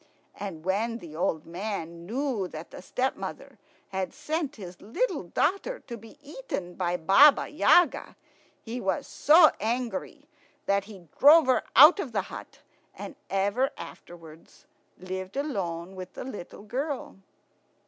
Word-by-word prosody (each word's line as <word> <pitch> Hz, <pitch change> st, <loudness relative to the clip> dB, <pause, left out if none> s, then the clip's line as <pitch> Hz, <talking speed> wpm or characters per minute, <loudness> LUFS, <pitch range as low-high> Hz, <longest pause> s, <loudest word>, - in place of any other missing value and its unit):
And 175 Hz, -5 st, -7 dB
when 220 Hz, +5 st, 0 dB
the 165 Hz, -8 st, -11 dB
old 160 Hz, -1 st, -1 dB
man 170 Hz, -2 st, -6 dB
knew 245 Hz, -4 st, -2 dB
that 160 Hz, -1 st, -9 dB
the -, -, -10 dB
stepmother 255 Hz, +8 st, -4 dB, 0.3 s
had 190 Hz, +3 st, -4 dB
sent 300 Hz, 0 st, -3 dB
his 180 Hz, -4 st, -10 dB
little 435 Hz, -, -1 dB
daughter 450 Hz, +6 st, -1 dB
to 235 Hz, -, -8 dB
be 225 Hz, +5 st, -14 dB
eaten 295 Hz, -, -6 dB
by 175 Hz, -1 st, -1 dB
Baba 195 Hz, -, +6 dB
Yaga, 350 Hz, +3 st, +3 dB, 0.5 s
he 240 Hz, +2 st, -5 dB
was 230 Hz, +9 st, -1 dB
so 315 Hz, +5 st, +6 dB
angry 240 Hz, +5 st, -3 dB, 0.4 s
that 200 Hz, 0 st, +1 dB
he 195 Hz, -5 st, -13 dB
drove 310 Hz, +3 st, +8 dB
her 255 Hz, -3 st, +3 dB
out 300 Hz, -, +9 dB
of 270 Hz, -, -4 dB
the -, -, +1 dB
hut, -, -, -10 dB, 0.3 s
and 295 Hz, -, -8 dB
ever 200 Hz, +7 st, +1 dB
afterwards 165 Hz, -2 st, -13 dB, 0.3 s
lived 185 Hz, +3 st, -6 dB
alone 190 Hz, -, -3 dB
with 185 Hz, -1 st, -8 dB
the -, -, -7 dB
little 205 Hz, -6 st, -9 dB
girl. 270 Hz, +5 st, -4 dB
210 Hz, 140 wpm, -27 LUFS, 180-275 Hz, 0.5 s, out